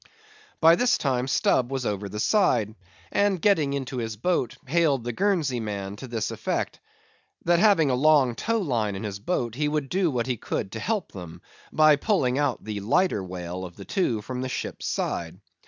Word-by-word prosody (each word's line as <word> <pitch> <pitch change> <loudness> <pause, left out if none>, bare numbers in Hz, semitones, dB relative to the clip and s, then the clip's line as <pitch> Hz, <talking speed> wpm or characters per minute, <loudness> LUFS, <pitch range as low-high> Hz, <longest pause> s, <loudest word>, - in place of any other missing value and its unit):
By 165 +1 +6
this 245 0 +3
time 130 -3 0
Stubb 130 -1 +2
was 135 -2 -2
over 100 -1 -2
the 105 +2 -6
side, 120 - +2 0.4
and 200 -2 +2
getting 160 -8 +2
into 135 -1 -4
his 115 -2 -3
boat, 125 - -1
hailed 145 -3 +2
the 120 0 -3
Guernsey 165 - +1
man 100 -3 -4
to 130 - -8
this 115 -2 -2
effect,—that 170 0 -3
having 185 -9 +4
a - - +1
long 135 -2 +4
tow 230 - -1
line 120 - -1
in 95 - -6
his 100 -2 -5
boat, 120 - -2
he 150 +4 -1
would 150 -2 -1
do 185 -2 +1
what 120 -5 -1
he 125 -2 -2
could 100 -1 -4
to 115 - -5
help 210 - -2
them, 90 -2 -10 0.3
by 155 -1 +5
pulling 140 - +1
out 145 -4 0
the 105 -2 -4
lighter 115 - +1
whale 90 0 -6
of 90 -2 -8
the 100 - -10
two 120 - -1
from 125 +2 -5
the 130 - -3
ship's 130 - -4
side. - - -3
130 Hz, 190 wpm, -25 LUFS, 110-160 Hz, 0.4 s, By